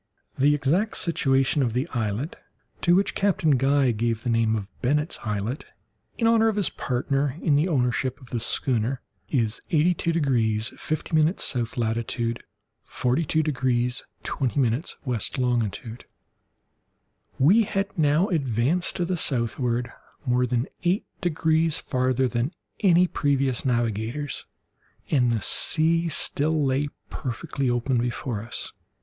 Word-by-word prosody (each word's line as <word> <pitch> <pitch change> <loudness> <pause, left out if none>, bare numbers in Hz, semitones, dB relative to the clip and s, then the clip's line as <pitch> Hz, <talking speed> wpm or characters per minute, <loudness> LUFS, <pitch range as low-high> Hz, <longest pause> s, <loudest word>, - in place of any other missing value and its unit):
The 145 +2 +4
exact 165 +10 +1
situation 135 -3 +2
of 120 -4 0
the 130 +6 -1
islet 120 - -2 0.5
(to 175 0 +4
which 195 +1 +2
Captain 195 -6 +2
Guy 135 0 +3
gave 115 0 -1
the 120 - 0
name 115 -1 +2
of 105 -1 -5
Bennet's 150 +5 0
Islet, 105 +5 -3 0.5
in 230 - 0
honour 225 0 +4
of 220 - +1
his 205 -4 +1
partner 135 +2 -1
in 150 -4 +2
the 150 +5 +3
ownership 130 -2 0
of 130 -4 -16
the 120 - -1
schooner) 120 +2 -1 0.3
is 115 -6 0
82 170 0 +2
degrees 115 -9 +1
50' 155 +1 -3
S. 125 - 0
latitude, 115 0 -2 0.4
42 155 +5 0
degrees 125 -4 0 0.2
20' 130 -3 -2
W. 125 -2 +2 0.6
longitude. 120 -2 -2 1.3
We 180 +12 +5
had 195 -2 -2
now 155 +2 +3
advanced 140 - 0
to 175 - 0
the 180 +1 -1
southward 120 -3 0 0.3
more 125 0 +2
than 120 0 0 0.2
eight 180 +3 +1 0.2
degrees 160 -2 +1
farther 130 0 0
than 125 +6 -2 0.2
any 180 -2 +5
previous 140 -6 0
navigators, 120 +3 -2 0.6
and 125 -5 +3
the 115 -2 -1
sea 165 +1 +3
still 155 0 +1
lay 135 +2 +1 0.2
perfectly 135 0 -3
open 120 +1 +1
before 120 -2 -2
us. 115 +2 -4
135 Hz, 130 wpm, -25 LUFS, 120-160 Hz, 1.3 s, We